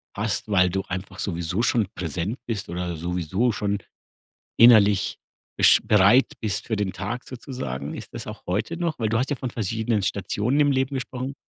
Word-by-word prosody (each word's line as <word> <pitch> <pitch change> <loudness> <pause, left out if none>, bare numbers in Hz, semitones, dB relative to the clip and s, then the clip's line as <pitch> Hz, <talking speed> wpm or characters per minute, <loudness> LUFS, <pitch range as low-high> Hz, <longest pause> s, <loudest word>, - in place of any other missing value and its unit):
hast, 110 +1 -2
weil 90 -3 +4
du 95 +2 -2
einfach 95 +2 -6
sowieso 85 +2 -2
schon 115 -3 +2
präsent 90 - -3
bist 110 -3 -3
oder 90 0 -3
sowieso 90 +7 0
schon 100 -1 -1 0.8
innerlich 105 -4 +6 0.4
bisch - - +6
bereit 105 +5 +5
bist 105 -1 -2
für 110 - -1
den 100 -2 -1
Tag 105 +7 -5
sozusagen? 75 - -6
Ist - - -10
das - - -6
auch - - -9
heute 105 - -2
noch? 170 -3 -2
Weil 110 -2 0
du 115 - +1
hast 130 +4 -1
ja 145 - 0
von 130 -1 -4
verschiedenen 110 0 -1
Stationen 105 +8 0
im 145 -1 +4
Leben 130 +1 0
gesprochen. 130 +1 -5
105 Hz, 180 wpm, -24 LUFS, 90-120 Hz, 0.8 s, innerlich